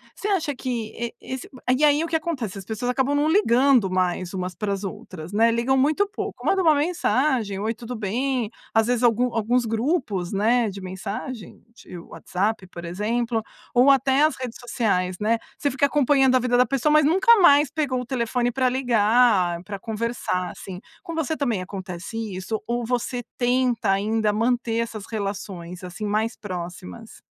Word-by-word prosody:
Você 405 - -5
acha 335 -8 0
que 255 0 -3 0.2
e 235 0 -4
esse 260 -1 -6 0.3
e 295 - 0
aí, 295 +1 +4
o - - -2
que 330 - -2
acontece, 280 - -2
as 195 - -8
pessoas 220 +4 -3
acabam 265 +3 +1
não 295 +2 +2
ligando 265 - +4
mais 185 0 -1
umas 180 -1 -4
para 205 +1 -2
as 195 0 -5
outras, 180 -3 -7
né, 225 +3 +4
ligam 240 +3 +1
muito 310 +10 +2
pouco. 410 - -6
Manda 385 -1 +3
uma 315 -3 +5
mensagem: 270 - 0
"Oi, 220 +3 -1
tudo 235 +2 -7
bem?" 235 +2 -1 0.2
Às 225 0 +3
vezes 245 0 0
algum 240 +1 +3
alguns 235 +2 +1
grupos, 225 - -1
né, 225 +3 +2
de 195 0 -8
mensagem, 195 - -7
de 180 - -11
WhatsApp, 190 +4 -3
por 170 -1 -10
exemplo, 225 +6 -1 0.3
ou 250 +3 +5
até 270 +1 +3
as 310 - +3
redes 250 -3 -6
sociais, 185 -7 -1
né. 225 +2 +2 0.2
Você 285 - 0
fica 270 +2 +2
acompanhando 275 -2 +3
a - - +5
vida 245 0 +1
da 250 - +5
pessoa, 275 +4 +1
mas 305 -1 +5
nunca 385 +10 +5
mais 290 -4 +6
pegou 275 -5 -1
o - - -7
telefone 245 0 -1
pra 255 +1 +1
ligar, 225 -7 +3
pra 200 +1 -6
conversar, 220 -4 -2
assim. 185 -2 -9 0.2
Com 335 - -6
você 320 -1 -1
também 235 -9 0
acontece 185 +2 -7 0.2
isso? 190 +4 -4
Ou 240 0 -1
você 245 +1 -2
tenta 245 -4 +1
ainda 210 +2 +1
manter 230 +1 0
essas 225 -3 -4
relações, 195 -4 -5
assim, 180 +4 -6
mais 215 +3 0
próximas? 175 - -8
235 Hz, 180 wpm, -24 LUFS, 200-265 Hz, 0.3 s, mais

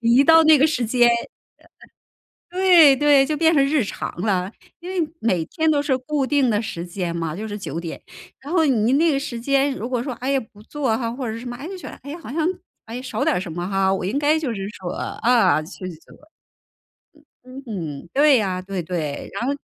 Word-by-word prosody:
一 240 +4 +4
到 325 +1 +7
那 315 -1 +7
个 290 +3 +4
时 255 -6 -1
间， 240 +1 +4 1.4
呃 365 - -5
呃， - - 0
对 325 -7 +8
对， 290 -1 +4
就 305 +2 -1
变 325 +1 +3
成 280 -2 +4
日 290 -2 +1
常 200 - -5
了， 190 -2 0 0.3
因 350 +2 -8
为 340 -5 -2
每 185 -8 +1
天 320 - -1
都 290 -2 +2
是 275 -3 0
固 275 +2 -2
定 280 -4 +2
的 210 -1 +1
时 175 -6 -5
间 175 -1 -4
嘛， 165 -2 -3
就 215 +3 -5
是 205 -1 -5
9 170 -5 -5
点。 170 -1 -7 0.4
然 285 +4 -8
后 325 -3 +3
你 240 -2 +2
那 320 +3 +3
个 275 - 0
时 260 -4 -5
间， 275 +1 +1
如 235 -1 -5
果 250 -2 -1
说， 260 -3 -4
哎 260 +2 -3
呀， 275 - +2
不 205 +1 -16
做 260 -4 -1
哈， 230 -2 -3
或 250 0 -5
者 220 - -3
是 225 - -6
什 250 - -8
么， 240 - -6
诶， 290 +5 -7
就 380 0 -7
觉 - - -9
得， - - -10
哎 285 - -9
呀， 325 - -6
好 - - -9
像， 320 +1 0 0.4
诶， 235 +2 -6
少 235 -4 -3
点 - - +2
儿 - - 0
什 180 -3 -6
么 175 +2 -4
哈， 195 -1 +1
我 190 - -3
应 215 +9 -1
该 300 +2 +3
就 285 -6 -2
是 195 -2 -5
说 185 -4 -7
啊， 230 -11 +2
继 160 +6 -11
续 - - -4
做。 155 - -19 1.3
嗯。 255 +1 -11
嗯 165 -10 -5
哼， - - -18
对 280 -3 +5
啊， 185 -2 -2
对 190 -2 -4
对， 155 -4 -4
然 240 - -2
后 280 - +1
250 Hz, 260 characters per minute, -22 LUFS, 195-290 Hz, 1.4 s, 对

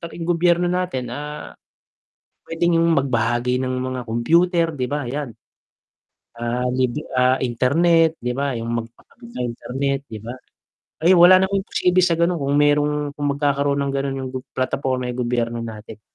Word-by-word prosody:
katabing 170 0 -7
gobyerno 175 0 +2
natin, 175 -10 -2
ah. 150 +3 -7 0.9
Pwedeng 165 +1 +1
yung 165 0 +3
mag 140 -2 0
bahagi 120 +1 0
ng 130 0 -2
mga 130 0 -3
kompyuter 165 +9 +2
'di 130 -5 -3
ba 145 +2 -3
yan. 130 -1 -5 1.0
Ah, 120 +2 -2
lib 125 -1 0 0.2
ah, 125 +1 +3
internet 160 +7 +3
'di 125 +1 -3
ba 140 -1 -1
yung 115 -1 -4
magpakabit 120 - -7
ng 125 - -3
internet 135 +3 -2
'di 110 -5 -9
ba? 115 +3 -7 0.6
Ay, 170 +4 +4
wala 180 +1 +8
naman 190 +1 +1
imposible 185 -2 +1
sa 170 -2 +2
ganon 170 -1 +1
kung 140 +1 +1
merong, 145 0 +2
kung 145 -1 -2
magkakaroon 140 -1 +1
ng 140 - -2
ganon 135 0 -2
yung 130 -1 -4
gob 130 - -4 0.2
plataporma 130 0 -1
yung 125 0 -3
gobyerno 120 -1 -1
natin. 110 -1 -9
140 Hz, 165 wpm, -21 LUFS, 125-165 Hz, 1.0 s, wala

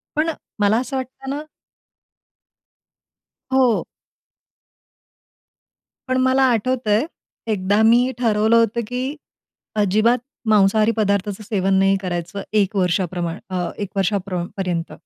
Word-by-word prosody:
पण 315 +2 +1 0.3
मला 205 +2 +3
असं 265 +2 -4
वाटतं 260 +1 -7
ना 290 +2 -3 2.1
हो. 255 -4 +3 2.2
पण 255 - +1
मला 260 +1 +3
आठवतं 240 0 0
आहे. 220 +9 +3 0.5
एकदा 205 +1 +1
मी 240 +3 +5
ठरवलं 220 -1 +3
होतं, 230 0 +2
की 255 +5 -3 0.7
अजिबात 215 +5 +3 0.3
मांसाहारी 215 +1 +4
पदार्थाचं 200 -1 0
सेवन 195 -3 0
नाही 195 0 +4
करायचं. 175 +1 -4
1 205 -1 +1
वर्षाप्रमाण 180 -1 -1
अ, 180 -2 -2
1 205 -2 -4
वर्षा 195 +1 +1
प्र 180 -2 -2
पर्यंत. 175 -3 -2
210 Hz, 110 wpm, -21 LUFS, 195-245 Hz, 2.2 s, मी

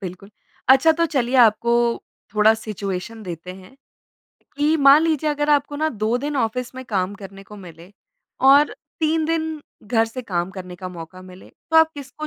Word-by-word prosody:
बिल्कुल। 190 +1 -9 0.4
अच्छा 270 +5 +6
तो 335 +1 0
चलिए 260 -3 -1
आपको 235 0 +4 0.6
थोड़ा 215 +1 +5
सिचुएशन 215 0 -6
देते 180 -1 -8
हैं। 190 +7 -16 0.8
कि 300 +2 +2
मान 280 +1 +6
लीजिए 310 -2 0
अगर 295 0 -1
आपको 290 0 +1
ना 310 +2 0
2 220 -2 -1
दिन 290 +2 -4
ऑफिस 250 +1 -2
में 260 0 -8
काम 195 -3 -2
करने 195 -1 -11
को 210 +1 -13
मिले 175 0 -13 0.6
और 285 +2 +5 0.3
3 315 0 +1
दिन 320 -1 -2 0.2
घर 225 +1 +1
से 250 +3 -7
काम 180 -4 -3
करने 185 -2 -9
का 185 +1 -7
मौका 180 +1 -10
मिले, 185 0 -14 0.2
तो 320 - +3
आप 320 0 +6
किसको 285 +2 -8
235 Hz, 175 wpm, -21 LUFS, 190-295 Hz, 0.8 s, अच्छा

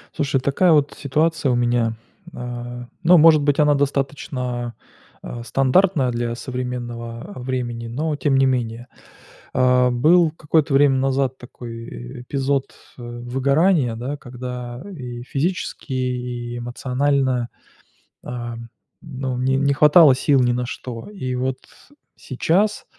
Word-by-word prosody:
Слушай, 140 -2 0
такая 140 +7 +2
вот 145 -2 +3
ситуация 150 +1 0
у - - +2
меня. 120 -2 +1 0.4
А, 120 0 -6 0.2
ну, 175 +2 +7
может 155 -1 +7
быть, 145 0 +1
она 150 -1 +5
достаточно, 130 -3 -2 0.5
а, 120 -1 -7
стандартная 135 +2 +2
для 120 0 -2
современного, 120 - -5
а, - - -8
времени, 125 -2 -3
но 150 +6 -2
тем 145 -2 +1
не 135 - +4
менее. 120 -2 -1 0.7
А, 125 0 +4
был 160 +7 +4
какое-то 155 -1 0
время 135 0 +5
назад 135 0 0
такой, 115 -2 -9
э, - - -9
эпизод, 135 +1 -1 0.3
э, - - -8
выгорания, 130 +4 +1
да, 125 +5 -4
когда 125 -1 -7
и 125 -7 -7
физически, 150 0 -3
и 125 -1 -3
эмоционально, 130 0 0 0.7
а, 120 -1 -5 0.5
ну, 130 -4 -4
не 130 +1 +1
не 140 +1 +2
хватало 150 0 +7
сил 140 +1 +2
ни 120 -1 +2
на 125 0 -1
что. 125 - -7
И 130 -12 -4
вот 130 +1 -2 0.6
сейчас 185 +10 0
130 Hz, 130 wpm, -21 LUFS, 120-145 Hz, 0.7 s, ну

